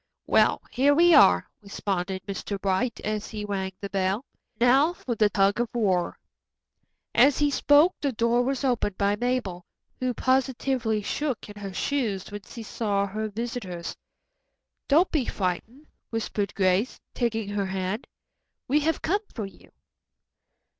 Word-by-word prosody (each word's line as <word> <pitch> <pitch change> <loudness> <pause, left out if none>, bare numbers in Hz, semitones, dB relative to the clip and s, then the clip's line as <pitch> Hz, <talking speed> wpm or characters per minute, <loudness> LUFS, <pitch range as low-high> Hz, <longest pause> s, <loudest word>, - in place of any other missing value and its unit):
"Well, - - +3
here 280 +3 +3
we 345 +2 +6
are," 90 - +6
responded 190 -2 -3
Mr. 200 0 -4
Bright, 200 +5 0
as 215 -1 -3
he 210 -2 -5
rang 190 -2 -2
the 200 - -4
bell. 195 +5 0 0.3
"Now 270 +7 +4
for 255 -8 -4
the 215 -2 +3
tug 200 +1 +2
of 240 -1 0
war." 190 -6 +1 1.0
As 280 -1 +5
he 295 -1 +2
spoke 290 +6 +5
the 280 - 0
door 235 +1 +2
was 265 +2 -1
opened 240 -7 0
by 200 0 +2
Mabel, 235 -6 -2 0.4
who 255 -1 -1
positively 260 -4 0
shook 270 0 -3
in 205 - -10
her 195 -1 -5
shoes 210 -3 -2
when 205 0 -6
she 230 +3 -10
saw 205 -2 -1
her 215 +2 -4
visitors. 210 -6 -5 0.9
"Don't 325 +6 +4
be 290 -6 +1
frightened," 220 - -3 0.2
whispered 210 -3 -2
Grace, 190 +4 +1
taking 225 -4 -1
her 205 -1 -1
hand. 190 +3 -3 0.6
"We 290 +4 +3
have 315 +1 -1
come 400 +5 +1
for 220 - -3
you." 195 - -14
220 Hz, 145 wpm, -26 LUFS, 200-260 Hz, 1.0 s, we